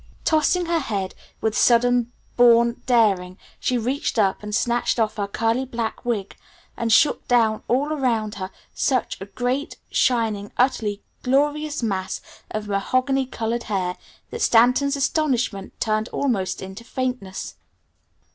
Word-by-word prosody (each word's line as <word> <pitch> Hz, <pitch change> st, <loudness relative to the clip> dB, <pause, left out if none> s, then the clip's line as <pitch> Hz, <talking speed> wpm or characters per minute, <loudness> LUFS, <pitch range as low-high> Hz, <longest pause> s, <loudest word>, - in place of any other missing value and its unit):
Tossing 320 Hz, +3 st, +2 dB
her 335 Hz, 0 st, +1 dB
head 200 Hz, -9 st, -3 dB, 0.3 s
with 220 Hz, -1 st, 0 dB
sudden 245 Hz, 0 st, +3 dB, 0.2 s
born 235 Hz, -1 st, +5 dB
daring 195 Hz, -7 st, +2 dB, 0.2 s
she 250 Hz, -, 0 dB
reached 250 Hz, +3 st, -1 dB
up 195 Hz, -3 st, +2 dB
and 210 Hz, 0 st, -3 dB
snatched 240 Hz, +1 st, +1 dB
off 220 Hz, -1 st, 0 dB
her 200 Hz, -1 st, -1 dB
curly 225 Hz, +5 st, 0 dB
black 235 Hz, -3 st, -4 dB
wig, 215 Hz, -5 st, -2 dB, 0.4 s
and 230 Hz, -1 st, -1 dB
shook 290 Hz, +7 st, +4 dB
down 225 Hz, -3 st, +3 dB
all 280 Hz, +5 st, +1 dB
around 230 Hz, -7 st, 0 dB
her 185 Hz, -, -3 dB, 0.2 s
such 255 Hz, -7 st, 0 dB
a 195 Hz, -, -6 dB
great, 250 Hz, -, -2 dB
shining, 220 Hz, -5 st, +1 dB
utterly 220 Hz, -5 st, +1 dB, 0.2 s
glorious 295 Hz, +2 st, +1 dB
mass 190 Hz, -4 st, -2 dB, 0.3 s
of 215 Hz, -1 st, -4 dB
mahogany 255 Hz, +7 st, +1 dB
colored 230 Hz, -1 st, -3 dB
hair 185 Hz, -3 st, -1 dB, 0.4 s
that 460 Hz, -, -5 dB
Stanton's 250 Hz, +5 st, +4 dB
astonishment 260 Hz, -8 st, -1 dB
turned 215 Hz, 0 st, 0 dB
almost 195 Hz, -11 st, -1 dB
into 190 Hz, +4 st, -8 dB
faintness. 250 Hz, -7 st, -4 dB
235 Hz, 135 wpm, -23 LUFS, 210-260 Hz, 0.4 s, born